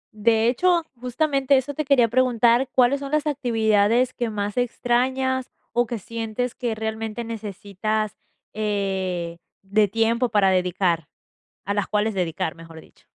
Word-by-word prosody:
De 225 Hz, +1 st, +3 dB
hecho, 340 Hz, +7 st, +2 dB, 0.2 s
justamente 275 Hz, +2 st, +1 dB
eso 270 Hz, +2 st, -2 dB
te 305 Hz, +2 st, -3 dB
quería 265 Hz, -4 st, +4 dB
preguntar, 245 Hz, +1 st, +3 dB
¿cuáles 260 Hz, +2 st, +3 dB
son 280 Hz, 0 st, -6 dB
las 305 Hz, 0 st, +1 dB
actividades 235 Hz, -3 st, +2 dB
que 240 Hz, -2 st, -2 dB
más 205 Hz, 0 st, -3 dB
extrañas, 255 Hz, +2 st, 0 dB, 0.2 s
o 240 Hz, 0 st, +1 dB
que 235 Hz, 0 st, -3 dB
sientes 230 Hz, +3 st, -4 dB
que 240 Hz, -3 st, -3 dB
realmente 220 Hz, +1 st, -4 dB
necesitas, 215 Hz, -1 st, -3 dB, 0.4 s
eh, 190 Hz, -5 st, -2 dB, 0.3 s
de 205 Hz, +2 st, +2 dB
tiempo 230 Hz, +4 st, +1 dB
para 205 Hz, -3 st, +3 dB
dedicar? 180 Hz, -3 st, +1 dB, 0.6 s
A 200 Hz, -, -1 dB
las 205 Hz, -1 st, -1 dB
cuales 210 Hz, +1 st, 0 dB
dedicar, 165 Hz, -4 st, -2 dB
mejor 165 Hz, -1 st, -12 dB
dicho. -, -, -23 dB
225 Hz, 140 wpm, -23 LUFS, 205-250 Hz, 0.6 s, quería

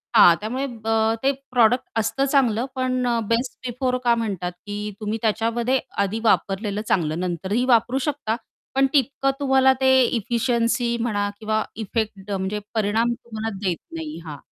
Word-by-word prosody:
हां, 175 Hz, -6 st, +8 dB
त्यामुळे 245 Hz, +6 st, -3 dB, 0.2 s
अ, 225 Hz, 0 st, +2 dB
ते 270 Hz, -, +4 dB, 0.2 s
प्रॉडक्ट 245 Hz, 0 st, +4 dB, 0.2 s
असतं 225 Hz, +5 st, 0 dB
चांगलं 245 Hz, -4 st, +3 dB
पण 255 Hz, -1 st, 0 dB
अ, 235 Hz, -1 st, +1 dB
बेस्ट 235 Hz, +3 st, 0 dB, 0.2 s
बिफोर 250 Hz, +1 st, -1 dB
का 235 Hz, -1 st, +4 dB
म्हणतात, 195 Hz, -6 st, -2 dB
की 205 Hz, 0 st, -4 dB
तुम्ही 215 Hz, 0 st, -2 dB
त्याच्यामध्ये 230 Hz, +3 st, +1 dB, 0.2 s
आधी 205 Hz, +3 st, -2 dB
वापरलेलं 205 Hz, -1 st, +1 dB
चांगलं 160 Hz, -3 st, +1 dB
नंतरही 185 Hz, +6 st, -1 dB
वापरू 245 Hz, +1 st, +3 dB
शकता 270 Hz, -6 st, -2 dB, 0.4 s
पण 270 Hz, 0 st, +4 dB
तितकं 275 Hz, 0 st, +2 dB
तुम्हाला 265 Hz, -1 st, +4 dB
ते 265 Hz, -, +4 dB, 0.3 s
एफिशियन्सी 235 Hz, +1 st, 0 dB
म्हणा 205 Hz, -3 st, 0 dB
किंवा 215 Hz, 0 st, 0 dB, 0.2 s
इफेक्ट 205 Hz, -2 st, -3 dB
म्हणजे 195 Hz, +1 st, -2 dB
परिणाम 225 Hz, +2 st, +1 dB
तुम्हाला 225 Hz, -2 st, -6 dB, 0.2 s
देत 175 Hz, -2 st, 0 dB, 0.2 s
नाही 160 Hz, -1 st, -5 dB
हा, 150 Hz, -2 st, -7 dB
225 Hz, 150 wpm, -23 LUFS, 205-250 Hz, 0.4 s, हां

